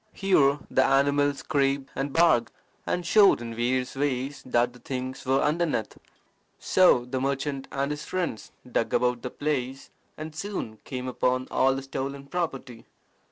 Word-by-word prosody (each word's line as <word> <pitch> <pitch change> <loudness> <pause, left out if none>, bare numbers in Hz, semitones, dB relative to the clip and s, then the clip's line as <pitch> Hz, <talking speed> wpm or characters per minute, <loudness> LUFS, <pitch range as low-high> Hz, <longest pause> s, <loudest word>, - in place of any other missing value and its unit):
Here 145 -8 +3
the 130 - +4
animal 140 +1 +3
scraped 140 -1 -1
and 140 +1 -2
barked, 160 -7 +3 0.4
and 180 - -1
showed 200 +3 +6
in 115 -1 -6
various 125 +3 -1
ways 135 0 -2
that 120 0 +1
the 125 - -15
things 130 0 -5
were 135 +1 +3
underneath. 150 -7 0 0.6
So 180 -10 +4
the 130 +1 -3
merchant 140 0 -2
and 140 +1 -1
his 150 0 -4
friends 175 -10 -3 0.2
dug - - 0
about 125 -1 +1
the 125 - -4
place, 135 -3 -3 0.3
and 155 0 -7
soon 160 - -5
came 130 -1 -5
upon 130 0 0
all 135 0 +3
the 135 - -5
stolen 135 +1 -5
property. 135 -7 -4
135 Hz, 155 wpm, -26 LUFS, 125-145 Hz, 0.6 s, showed